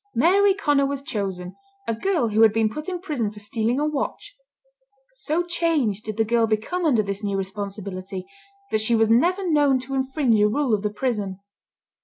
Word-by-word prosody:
Mary 385 +9 +4
Conner 290 -8 +2
was 280 0 -4
chosen, 190 -6 -4 0.3
a - - +1
girl 295 - 0
who 215 +1 +2
had 225 -1 +7
been 220 0 +1
put 305 - -5
in 360 -1 -3
prison 290 - -2
for 210 - -16
stealing 225 +4 -1
a 300 - +1
watch. 300 - -3 0.8
So 345 -8 -1
changed 320 - 0
did 215 -1 -5
the 225 - +2
girl 230 0 +2
become 220 +12 -1
under 240 -9 +3
this 200 +1 -4
new 200 -1 -1
responsibility, 195 -1 -5 0.5
that 220 - +2
she 230 +2 +4
was 225 0 +3
never 360 +11 +3
known 290 -4 +3
to 265 +2 -7
infringe 265 -3 +1
a 210 - +5
rule 250 +2 0
of 205 - +1
the 210 - -1
prison. 205 -4 -3
230 Hz, 190 wpm, -23 LUFS, 210-295 Hz, 0.8 s, had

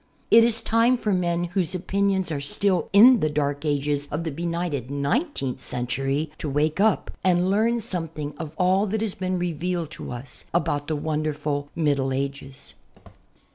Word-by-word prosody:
It 230 - +8
is 230 -1 +1
time 230 +3 +3
for 210 -3 -1
men 175 -1 0
whose 175 +1 -1
opinions 190 0 0
are 145 -2 -2
still 185 +6 0
in 235 +5 +8
the 155 - +1
dark 145 0 -1
ages 145 0 0
of 150 +3 -3
the 160 - -3
benighted 170 -4 -3
nineteenth 140 - -1
century 135 +5 -2
to 150 - -3
wake 150 +4 0
up 215 0 +2
and 180 0 +3
learn 230 +3 +2
something 165 -8 -5
of 160 -1 -6
all 190 +3 +3
that 215 +2 -2
has 220 -3 -1
been 185 0 -2
revealed 175 -1 -2
to - - -7
us 125 +2 -8
about 145 -3 0
the 155 - -1
wonderful 150 -1 -2
Middle 140 -5 +1
Ages. 140 0 -5
165 Hz, 165 wpm, -24 LUFS, 145-190 Hz, -, It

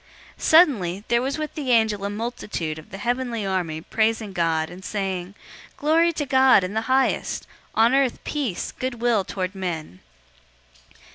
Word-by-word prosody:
002:013 - - -20
Suddenly, 210 - +4
there 235 0 +3
was 275 +3 -2
with 305 -1 -4
the 285 -4 -4
angel 220 -4 +3
a 200 - -1
multitude 205 -8 -4
of 155 - -14
the 195 - -8
heavenly 240 0 -2
army 175 -5 -2
praising 220 +1 0
God, 165 -2 0
and 180 +2 -11
saying, 190 -2 -3 0.4
002:014 - - -34
"Glory 330 +3 +3
to 300 -2 -2
God 260 -6 +5
in 185 +2 -4
the 220 - 0
highest, 265 0 +1 0.3
on 230 +3 +4
earth 270 -3 +2
peace, 270 - -3
good 255 -1 -4
will 235 -4 +2
toward 185 0 -4
men." 165 - -5
220 Hz, 165 wpm, -23 LUFS, 185-260 Hz, 0.4 s, God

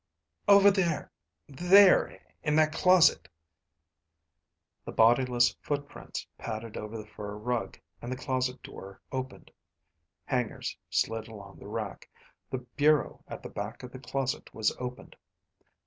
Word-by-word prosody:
"Over 200 0 +8
there... 175 -6 -1 0.4
there 180 +7 +5 0.2
in 150 -1 0
that 155 0 +3
closet." 180 +1 +5 1.6
The - - -7
bodiless 120 +1 +4
footprints 145 -1 -5
padded 110 0 -6
over 105 +1 -6
the 105 - -8
fur 105 -1 -8
rug, 120 +2 -3 0.2
and 120 - -6
the - - -1
closet 130 0 -2
door 95 0 -10
opened. 130 0 -6 0.7
Hangers 125 -4 -2
slid 115 0 -1
along 100 -3 -12
the - - -11
rack. - - -5 0.4
The 130 -1 -5
bureau 150 0 +2
at - - -8
the - - -7
back 105 +5 -6
of 125 - -8
the 130 - -9
closet 135 0 -3
was 110 - +1
opened. 125 0 -7
125 Hz, 130 wpm, -29 LUFS, 115-150 Hz, 1.6 s, Over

